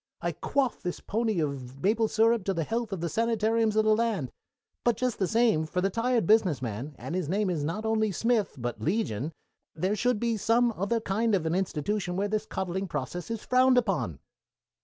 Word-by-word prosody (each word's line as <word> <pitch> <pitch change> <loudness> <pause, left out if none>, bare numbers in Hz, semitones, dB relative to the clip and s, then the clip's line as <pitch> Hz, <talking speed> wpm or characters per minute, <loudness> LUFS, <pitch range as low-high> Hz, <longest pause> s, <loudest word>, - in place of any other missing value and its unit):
I - - -1
quaff 275 -4 -1
this 180 - -3
pony 220 -2 -1
of 135 -2 -5
maple 220 +3 +3
syrup 225 0 +3
to 195 - 0
the 165 - 0
health 230 +5 -2
of 190 -4 -3
the 170 - -1
sanitariums 225 +2 +1
of 215 0 +3
the 215 0 +5
land 215 - -1 0.5
but 240 -1 +2
just 250 -3 -1
the 190 - +1
same, 220 -9 +2
for 180 - -2
the 195 +2 +1
tired 235 0 +1
business 190 - +4
man, 125 +4 -5
and - - -6
his 180 -4 -2
name 200 +1 +1
is 155 -4 -2
not 180 +9 -3
only 220 -1 +1
Smith, 225 0 0
but 120 -3 -4
Legion, 155 - -1 0.4
there 185 +6 0
should 245 +1 +1
be 230 -1 0
some 230 +3 +2
other 205 +5 0
kind 220 +2 +1
of 175 -4 -1
an 160 - 0
institution 180 +1 -1
where 200 +2 0
this 215 0 -1
coddling 190 +1 -3
process 165 - -4
is 230 -2 -4
frowned 255 0 +4
upon." 155 - 0
205 Hz, 200 wpm, -28 LUFS, 170-230 Hz, 0.5 s, the